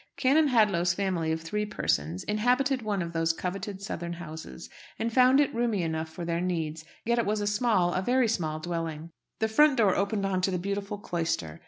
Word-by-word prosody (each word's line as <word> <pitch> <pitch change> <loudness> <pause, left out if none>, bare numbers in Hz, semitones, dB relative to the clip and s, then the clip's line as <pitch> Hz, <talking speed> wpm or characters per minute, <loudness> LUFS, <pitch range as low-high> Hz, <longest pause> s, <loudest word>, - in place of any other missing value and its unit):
Canon 295 +4 +4
Hadlow's 200 -9 +3
family 180 -5 -1
of 160 0 -2
three 210 +6 -2
persons 85 - -1
inhabited 250 +5 +1
one 205 -4 -1
of 170 0 -6
these 165 0 +2
coveted 195 +3 -5
southern 170 -3 -4
houses, 160 - -8 0.3
and 230 0 -2
found 255 +2 +6
it 290 - +2
roomy 230 -5 0
enough 160 -1 -2
for 170 +2 -7
their 170 0 -1
needs; 165 -3 -2 0.2
yet 235 +1 +2
it 235 - +1
was 210 +1 0
a 205 - -1
small 205 -4 +2
a 185 - 0
very 250 +4 +2
small 160 -8 -1
dwelling. 165 -1 -4 0.3
The 220 - +1
front 280 +5 +4
door 205 -5 +4
opened 200 0 0
on 190 -1 0
to 185 - +2
the 185 - -1
beautiful 200 +2 -3
cloister. 165 - -3
190 Hz, 200 wpm, -28 LUFS, 165-220 Hz, 0.3 s, found